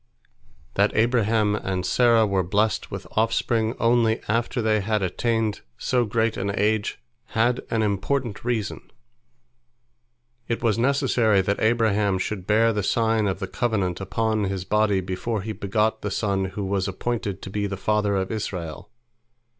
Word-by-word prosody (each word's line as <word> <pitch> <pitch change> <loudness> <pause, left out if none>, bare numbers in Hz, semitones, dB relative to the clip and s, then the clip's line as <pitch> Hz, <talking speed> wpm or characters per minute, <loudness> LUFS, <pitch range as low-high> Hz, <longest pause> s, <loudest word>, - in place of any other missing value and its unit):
" 60 -1 -32
That 100 +1 +2
Abraham 110 -2 +2
and 95 -3 -2
Sarah 115 -3 +4
were 100 -2 +1
blessed 105 +4 0
with - - -6
offspring 115 +1 +1
only 115 -1 +3
after 115 +3 0
they 110 -2 +2
had 105 0 0
attained 110 +3 -1 0.2
so 125 -2 +1
great 115 +1 0
an 100 +1 -1
age, 105 0 0 0.4
had 120 +2 +2
an 110 -1 +1
important 105 +3 -1
reason. 115 -4 -3 1.6
It 115 0 -2
was 115 -1 +2
necessary 120 -6 +3
that 100 +2 -1
Abraham 110 -3 +2
should 95 0 -4
bear 115 +2 +4
the 105 - -1
sign 110 +1 +1
of 95 - -1
the 95 - -4
covenant 100 -5 -1
upon 110 +2 0
his 95 -1 -3
body 105 -1 +2
before 95 +3 -3
he 110 - -4
begot 110 +2 0
the 105 - -2
son 100 -1 0
who 95 +1 -4
was 95 0 -1
appointed 100 0 -3
to 95 - -7
be 100 0 -1
the 100 -1 -4
father 105 0 +1
of 95 -1 -1
Israel. 90 -7 -5
105 Hz, 155 wpm, -24 LUFS, 100-115 Hz, 1.6 s, Sarah